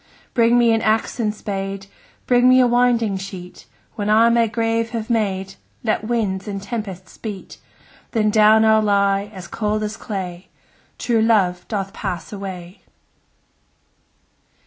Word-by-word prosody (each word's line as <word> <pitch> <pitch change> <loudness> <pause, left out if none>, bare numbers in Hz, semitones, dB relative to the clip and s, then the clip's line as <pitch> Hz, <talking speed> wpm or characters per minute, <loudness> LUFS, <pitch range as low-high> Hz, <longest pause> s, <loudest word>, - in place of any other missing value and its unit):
Bring 235 0 +4
me 235 -1 +4
an 225 0 +2
axe 220 +3 0
and 215 -2 +1
spade, 195 -2 -5 0.4
Bring 245 0 +4
me 255 0 +6
a 255 - +6
winding 240 -4 +2
sheet; 190 -2 -9 0.3
When 205 -1 -3
I 225 +2 +5
my 235 0 +3
grave 225 0 -1
have 225 +1 -4
made, 195 -4 0
15 195 - -15 0.3
Let 220 -2 0
winds 215 -4 -1
and 200 -1 -4
tempests 195 -4 -7
beat: 205 -4 -8 0.5
Then 215 -2 +1
down 215 +1 +5
I'll 220 0 +5
lie, 200 -1 +1
as 190 -3 -9
cold 215 -1 -2
as 210 0 -4
clay: 185 -3 -6 0.5
True 230 -2 +1
love 195 -6 +2
doth 195 -3 -3
pass 180 -3 -5
away! 190 -2 -8
215 Hz, 145 wpm, -20 LUFS, 195-230 Hz, 0.5 s, me